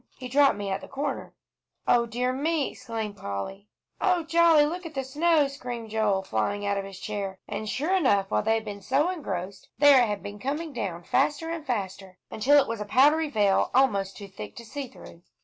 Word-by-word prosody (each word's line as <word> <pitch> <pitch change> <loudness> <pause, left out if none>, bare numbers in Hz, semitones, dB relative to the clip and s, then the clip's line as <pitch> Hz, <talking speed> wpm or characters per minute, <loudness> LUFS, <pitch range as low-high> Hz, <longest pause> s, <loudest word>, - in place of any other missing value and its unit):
He 255 - -7
dropped 275 -1 +4
me 200 -1 -3
at 190 - -2
the - - -10
corner." 275 +2 -4 0.5
"O 235 -1 +4
dear 250 +2 -1
me!" 300 +2 0
exclaimed 220 -3 -5
Polly. 100 - -6 0.3
"Oh, 360 -3 +2
jolly! 330 -2 +5
look 350 +4 -4
at 325 -3 -9
the 270 - -1
snow!" 300 +2 +2
screamed 245 -5 -7
Joel, 210 -3 +1
flying 190 - -1
out 200 0 +1
of 195 - -5
his 195 -1 -10
chair. 200 -3 -4
And 215 0 -4
sure 315 - 0
enough, 205 - +2
while 105 - +2
they 225 - +2
had 225 0 -3
been 200 -1 -7
so 275 - +1
engrossed, 195 - -5
there 285 -3 +7
it - - +1
had 205 -2 -3
been 205 0 -7
coming 295 +5 -3
down 175 -7 -4
faster 295 - 0
and 335 -2 -4
faster, 195 -7 -4
until 280 +7 +4
it - - +1
was 230 -2 -4
a - - -3
powdery 295 +8 +4
veil, 205 -7 +2
almost 200 -8 +2
too 200 - -8
thick 105 - -9
to 235 - -10
see 275 +4 -6
through. 170 -8 -14
235 Hz, 210 wpm, -27 LUFS, 200-290 Hz, 0.5 s, there